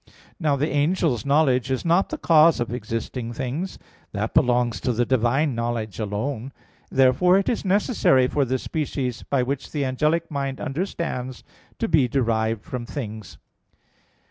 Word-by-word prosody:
Now 150 Hz, -5 st, +2 dB
the 140 Hz, +2 st, 0 dB
angel's 145 Hz, -3 st, +1 dB
knowledge 135 Hz, -3 st, +3 dB
is 130 Hz, +3 st, -2 dB
not 170 Hz, +3 st, +3 dB
the 310 Hz, -, -4 dB
cause 165 Hz, -, +5 dB
of 120 Hz, 0 st, -2 dB
existing 115 Hz, +1 st, -4 dB
things; 135 Hz, +10 st, -4 dB, 0.4 s
that -, -, -2 dB
belongs 120 Hz, -1 st, +2 dB
to 125 Hz, -, 0 dB
the 120 Hz, +2 st, +1 dB
Divine 130 Hz, +4 st, +1 dB
knowledge 115 Hz, -4 st, -3 dB
alone. 110 Hz, +5 st, -3 dB, 0.4 s
Therefore 135 Hz, +8 st, +4 dB
it 195 Hz, -, 0 dB
is 235 Hz, -, 0 dB
necessary 190 Hz, -, +3 dB
for 145 Hz, +2 st, +1 dB
the 130 Hz, 0 st, 0 dB
species, 130 Hz, -5 st, -3 dB
by 135 Hz, -3 st, 0 dB
which 135 Hz, +2 st, -4 dB
the 145 Hz, -3 st, -1 dB
angelic 155 Hz, +6 st, 0 dB
mind 135 Hz, -2 st, -3 dB
understands, 140 Hz, -5 st, -4 dB, 0.3 s
to 230 Hz, -, -1 dB
be 150 Hz, -, +3 dB
derived 115 Hz, -4 st, 0 dB
from 125 Hz, -2 st, -5 dB
things. 110 Hz, -7 st, -7 dB
130 Hz, 150 wpm, -23 LUFS, 120-155 Hz, 0.4 s, cause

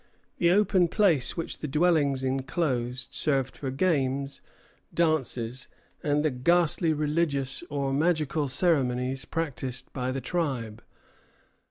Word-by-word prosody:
] -, -, -42 dB
The 170 Hz, -, +4 dB
open 190 Hz, -1 st, +4 dB
place 175 Hz, -, +2 dB
which 165 Hz, -, -4 dB
the 150 Hz, -, -4 dB
dwellings 150 Hz, -3 st, +2 dB
enclosed 130 Hz, -2 st, -1 dB
served 135 Hz, -4 st, +1 dB
for 135 Hz, -, -4 dB
games, 140 Hz, -2 st, 0 dB, 0.5 s
dances, 130 Hz, -7 st, -1 dB, 0.3 s
and 150 Hz, +1 st, +1 dB
the 155 Hz, -, +2 dB
ghastly 165 Hz, +5 st, +2 dB
religious 150 Hz, -3 st, 0 dB
or 140 Hz, -2 st, -1 dB
magical 155 Hz, -1 st, +1 dB
ceremonies 130 Hz, -4 st, 0 dB
practised 135 Hz, -5 st, -4 dB
by 130 Hz, -1 st, -2 dB
the 135 Hz, -, -2 dB
tribe. 130 Hz, -10 st, -2 dB
140 Hz, 120 wpm, -27 LUFS, 130-165 Hz, 0.5 s, The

